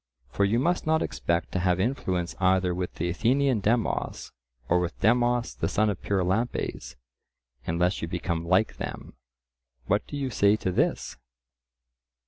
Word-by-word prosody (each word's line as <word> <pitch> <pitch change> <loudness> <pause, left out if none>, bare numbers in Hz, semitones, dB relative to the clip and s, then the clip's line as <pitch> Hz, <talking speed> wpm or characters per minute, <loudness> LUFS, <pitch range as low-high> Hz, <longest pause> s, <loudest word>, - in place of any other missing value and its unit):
For 100 - +2
you 105 +4 +2
must 170 +6 0
not 160 0 +3
expect 85 0 -2
to 95 - -1
have 90 0 +1
influence 95 -6 -1
either 95 -1 +2
with 90 0 -4
the 85 - -2
Athenian 125 +7 +2
Demos 110 +3 -1 0.4
or 90 - +3
with 90 0 -3
Demos 120 +2 +2
the - - -2
son 105 0 +2
of 95 - -7
Pyrilampes, 100 +5 -1 0.7
unless 90 +3 0
you 80 - -2
become 85 -1 -2
like 95 +5 +2
them. - - -6 0.7
What 100 +7 0
do 145 - -5
you 135 -2 -2
say 100 -1 +4
to 95 -3 -2
this? - - -1
95 Hz, 150 wpm, -27 LUFS, 90-120 Hz, 0.7 s, say